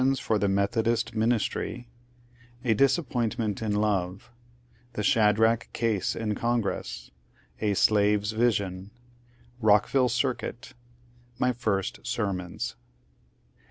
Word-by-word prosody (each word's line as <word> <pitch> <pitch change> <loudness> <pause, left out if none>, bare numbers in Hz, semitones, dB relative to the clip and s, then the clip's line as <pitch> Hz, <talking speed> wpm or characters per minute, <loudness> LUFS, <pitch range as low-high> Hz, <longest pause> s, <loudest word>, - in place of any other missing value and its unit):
for 110 -3 0
the 100 - +1
Methodist 110 +4 +1
ministry 120 +2 -1 0.4
— 120 +1 -25
A 115 - +4
dis^ypointment 115 - 0
in 110 -2 -1
Iotc 100 -2 0 0.4
— 120 0 -33
The 105 - -3
Shadrach 110 +2 +3
case 110 -5 0
in 110 -2 -2
Congress 115 -1 -2 0.2
— - - -31
A 105 -2 +1
slave's 105 +1 +3
visbn 100 -5 0 0.4
— 120 0 -29
Rookville 110 +5 +4
cironit 120 0 -2 0.3
— 120 0 -31
My 125 +1 +1
first 105 -5 -2
sermons. 100 -8 -3
110 Hz, 115 wpm, -27 LUFS, 105-120 Hz, 0.4 s, A